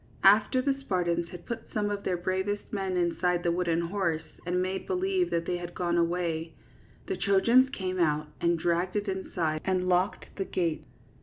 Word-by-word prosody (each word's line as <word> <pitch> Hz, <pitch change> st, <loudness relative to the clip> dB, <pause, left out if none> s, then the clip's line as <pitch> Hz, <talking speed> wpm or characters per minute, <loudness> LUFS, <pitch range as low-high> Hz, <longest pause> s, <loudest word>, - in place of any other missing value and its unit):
After 210 Hz, +6 st, +5 dB
the 280 Hz, 0 st, +2 dB
Spartans 175 Hz, -6 st, 0 dB
had 175 Hz, -1 st, -10 dB
put 235 Hz, -, -6 dB
some 205 Hz, -1 st, 0 dB
of 200 Hz, 0 st, -3 dB
their 180 Hz, -, 0 dB
bravest 190 Hz, +3 st, -1 dB
men 190 Hz, -2 st, -1 dB
inside 175 Hz, 0 st, +1 dB
the 170 Hz, -, +2 dB
wooden 170 Hz, -1 st, +1 dB
horse 170 Hz, -2 st, -1 dB, 0.2 s
and 180 Hz, +1 st, +1 dB
made 185 Hz, +1 st, -2 dB
believe 375 Hz, -1 st, +1 dB
that 170 Hz, 0 st, -1 dB
they 180 Hz, -, -1 dB
had 175 Hz, 0 st, -7 dB
gone 175 Hz, -1 st, 0 dB
away, 170 Hz, -1 st, 0 dB, 0.5 s
the 385 Hz, -, -2 dB
Trojans 235 Hz, -, +4 dB
came 185 Hz, -8 st, -3 dB
out 155 Hz, -2 st, +2 dB, 0.2 s
and 170 Hz, 0 st, +3 dB
dragged 175 Hz, +3 st, 0 dB
it 205 Hz, 0 st, -1 dB
inside 175 Hz, -5 st, -2 dB
and 185 Hz, -1 st, 0 dB
locked 180 Hz, +2 st, 0 dB
the 195 Hz, -, -1 dB
gates. 170 Hz, -4 st, -2 dB
180 Hz, 180 wpm, -29 LUFS, 170-200 Hz, 0.5 s, After